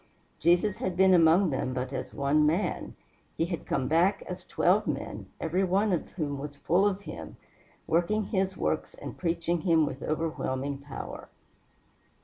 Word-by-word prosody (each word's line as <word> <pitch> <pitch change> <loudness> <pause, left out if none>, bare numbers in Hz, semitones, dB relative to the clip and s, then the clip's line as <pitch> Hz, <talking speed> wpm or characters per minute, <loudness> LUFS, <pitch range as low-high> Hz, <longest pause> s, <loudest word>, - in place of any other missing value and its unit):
Jesus 175 +5 +3
had 185 -2 -3
been 190 0 +6
among 170 +1 +5
them 130 -1 -2
but 130 +1 -3
as - - -4
one 145 +2 +2
man; 165 +7 0 0.4
he 165 - +2
had 170 -2 -5
come 130 - 0
back 175 +6 +3
as - - -8
twelve - - +2
men, - - -4
every 175 +4 0
one 195 +2 +2
of 175 - -2
whom 145 -5 -3
was 145 0 -6
full 175 +7 +2
of 200 -1 -1
him, 80 - -8 0.5
working 175 +6 +1
his 190 -2 -1
works 155 - -1
and - - -8
preaching 170 -1 -1
him 165 -3 +4
with 135 -2 -5
overwhelming 145 -3 -2
power. 140 0 -8
165 Hz, 160 wpm, -28 LUFS, 145-185 Hz, 0.5 s, been